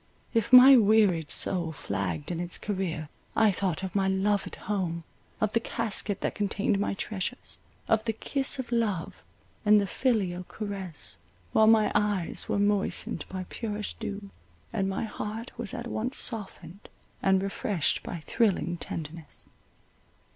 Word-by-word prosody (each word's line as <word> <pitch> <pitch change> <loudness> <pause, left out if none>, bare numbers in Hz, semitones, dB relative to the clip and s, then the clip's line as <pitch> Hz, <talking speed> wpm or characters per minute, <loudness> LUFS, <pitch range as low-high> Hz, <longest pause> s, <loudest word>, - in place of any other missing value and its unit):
If 230 -1 +1
my 255 +2 +11
wearied 205 -8 +4
soul 170 -4 0
flagged 95 - -3
in 170 - -3
its 175 0 -2
career, 185 -6 -3 0.3
I 220 -2 +5
thought 190 -2 -1
of 190 - -4
my 195 -1 +2
loved 195 +1 0
home, 180 -5 -2 0.4
of 215 -1 0
the 230 - +4
casket 215 -3 -2
that - - -1
contained 200 0 0
my 200 - 0
treasures, 205 +4 -4 0.3
of 220 0 +2
the 225 - +1
kiss 275 +5 -1
of 255 -2 -5
love 215 -8 -1 0.4
and 210 -1 +6
the 200 - +1
filial 195 -6 0
caress, 190 - -5 0.3
while 220 - +5
my 220 -1 +5
eyes 205 -4 0
were - - +1
moistened 205 0 0
by 185 -1 -5
purest 210 -2 -4
dew, 205 -2 -5 0.4
and 195 - 0
my 195 - -2
heart 220 +2 -5
was 235 -4 -4
at 235 - -5
once 240 +2 -2
softened 200 -5 -4 0.3
and 190 0 +3
refreshed 195 -4 0
by 170 - -6
thrilling 180 -2 +1
tenderness. 160 -2 -7
200 Hz, 145 wpm, -28 LUFS, 180-220 Hz, 0.4 s, my